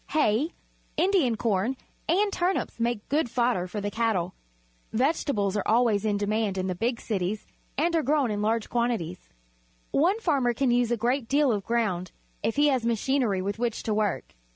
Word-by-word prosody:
Hay, 295 +1 +2 0.5
Indian 355 - +3
corn, 225 +4 0 0.3
and 395 +4 +2
turnips 360 -7 -1
make 230 -2 -1
good 290 -3 +1
fodder 235 -7 +1
for 210 +3 -5
the 205 0 -3
cattle. 210 -6 0 0.6
Vege 270 +8 +1
tables 205 -8 0
are 205 - +1
always 220 -2 +3
in 205 -1 +1
demand 205 -1 0
in 185 - -1
the 185 - -1
big 230 +6 -1
cities, 200 -1 -2 0.3
and 335 +4 +2
are 325 - +3
grown 285 -4 +1
in 205 0 -2
large 220 +1 0
quantities. 230 -8 -2 0.6
One 365 +9 +3
farmer 275 - +1
can 260 0 +2
use 240 -1 +2
a 240 - +1
great 240 +2 0
deal 285 0 +3
of 205 -3 -1
ground 205 -7 -1 0.3
if 225 - -1
he 290 +1 +4
has 260 -4 +1
machinery 230 -3 +1
with 200 +3 -3
which 235 -2 -1
to 220 - -1
work. 210 -2 -1
235 Hz, 180 wpm, -27 LUFS, 205-270 Hz, 0.6 s, he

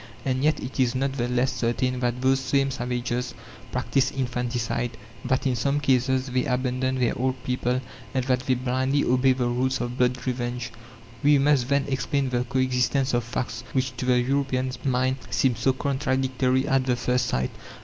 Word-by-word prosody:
And 130 0 0
yet 155 +1 +3
it 130 +2 -6
is 125 -1 +2
not 135 +1 0
the 120 -3 -1
less 125 +1 +1
certain 125 +1 0
that 125 0 -1
those 135 0 +4
same 135 +1 +1
savages 125 0 -2 0.4
practise 130 +1 +1
infanticide; 120 -2 -2 0.3
that 130 +1 0
in 130 -2 +2
some 140 +5 +1
cases 130 -1 +2
they 130 -1 0
abandon 130 0 0
their 120 -2 +1
old 130 +1 0
people, 125 0 0 0.3
and 130 -1 -1
that 130 -1 +2
they 130 - +3
blindly 130 +3 0
obey 130 +1 +3
the 125 -1 -1
rules 125 +2 0
of 120 0 -4
blood 125 0 +3
revenge. 120 -1 -3 0.5
We 145 0 +5
must 135 -3 +3
then 140 0 +2
explain 135 0 -1
the 125 0 0
coexistence 130 +1 +1
of 120 0 +2
facts 115 -1 -4
which, 130 -1 0
to 125 - -3
the 125 -1 +4
European 130 0 0
mind, 130 0 +1
seem 130 +2 +2
so 115 +4 +2
contradictory 130 -1 0
at 135 -1 +2
the 125 - +3
first 125 +1 0
sight. 65 +1 -1
130 Hz, 180 wpm, -25 LUFS, 125-130 Hz, 0.5 s, We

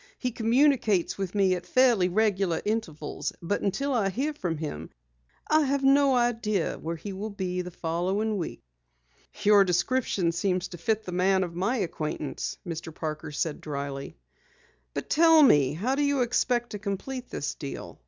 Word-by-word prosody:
He 250 - -2
communicates 230 - +2
with 195 0 -3
me 195 -2 +3
at 180 -1 -4
fairly 240 -8 +4
regular 195 -4 +1
intervals, 195 -9 -3
but 180 +4 -2
until 270 +9 -1
I 215 -6 +2
hear 275 +10 -2
from 175 - -3
him, 80 - -5 0.6
I 310 0 +4
have 275 0 0
no 275 0 +5
idea 230 -6 0
where 165 +1 -4
he 195 +5 -7
will 205 +3 -5
be 185 -3 -3
the 180 - -6
following 185 +6 -1
week." 165 - -5 0.8
"Your 205 -1 +7
description 185 -1 +1
seems 180 +1 -1
to 175 - -9
fit 220 +5 0
the 185 - -6
man 190 +1 +2
of 175 -2 -5
my 195 +9 0
acquaintance," 155 - -3
Mr. 165 0 -5
Parker 155 -1 -5
said 150 +1 -2
dryly. 140 - -5 0.8
"But - - -3
tell 325 -1 +6
me, 145 - +5
how 215 - -1
do 280 - 0
you 285 -2 +2
expect 240 0 +1
to 210 - -5
complete 220 +6 -5
this 145 - -3
deal? 140 -3 -8
195 Hz, 165 wpm, -27 LUFS, 170-240 Hz, 0.8 s, Your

